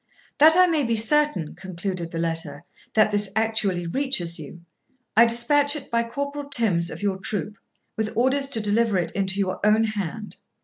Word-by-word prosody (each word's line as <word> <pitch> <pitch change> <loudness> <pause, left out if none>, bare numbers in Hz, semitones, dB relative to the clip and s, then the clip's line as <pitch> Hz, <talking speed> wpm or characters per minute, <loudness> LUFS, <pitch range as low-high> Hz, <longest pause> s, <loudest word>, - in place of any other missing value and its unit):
'That 315 +2 +7
I 365 - +7
may 325 -4 +1
be 235 -2 0
certain,' 230 - +1
concluded 185 -2 -5
the 165 - -7
letter, 165 -3 -3 0.3
'that 215 -1 +4
this 205 -1 0
actually 220 -5 +1
reaches 175 - -1
you, 160 +3 -10 0.5
I 230 +2 +7
despatch 285 +5 +3
it 290 - -8
by 235 0 +2
Corporal 280 +4 -5
Tims 200 -11 +2
of - - -8
your 195 -2 0
troop, 210 +2 -4 0.4
with 220 -1 -2
orders 265 +3 +1
to 235 - -1
deliver 210 0 +1
it 170 -2 -2
into 195 0 -2
your 190 -2 -2
own 215 +1 +4
hand.' 210 -1 -5
215 Hz, 175 wpm, -23 LUFS, 185-255 Hz, 0.5 s, That